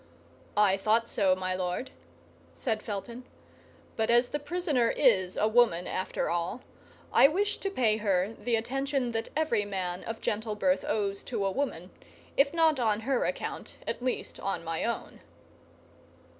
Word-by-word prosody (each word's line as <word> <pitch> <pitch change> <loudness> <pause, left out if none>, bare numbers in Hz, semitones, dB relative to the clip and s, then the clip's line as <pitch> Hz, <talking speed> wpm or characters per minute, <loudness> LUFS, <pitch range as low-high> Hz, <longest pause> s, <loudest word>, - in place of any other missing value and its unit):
"I 200 -2 +5
thought 220 +4 +2
so, 190 -5 +2
my 185 0 -2
lord," 180 -1 -3 0.6
said 215 - -2
Felton; 230 +4 -6 0.7
"but 220 -1 0
as 240 +1 +4
the 295 - -2
prisoner 295 -6 0
is 190 -9 +3
a 215 - +3
woman, 220 -7 +3
after 185 - -2
all, 175 +8 -2 0.5
I - - +8
wish 405 +7 0
to 390 - -2
pay 230 - +2
her 200 -1 +1
the 230 +2 -1
attention 270 +2 -1
that 225 -1 -3
every 300 -9 +1
man 185 -3 -3
of 225 0 -5
gentle 215 0 -2
birth 275 +6 +1
owes 200 -2 -1
to 200 - -2
a 195 - +1
woman, 190 -8 -3 0.4
if 280 +1 +4
not 320 -4 +3
on 220 -3 +1
her 255 +2 +1
account, - - -4
at - - -3
least 255 - -3
on 195 - -2
my 165 0 -2
own." 235 0 -4
225 Hz, 155 wpm, -29 LUFS, 195-255 Hz, 0.7 s, I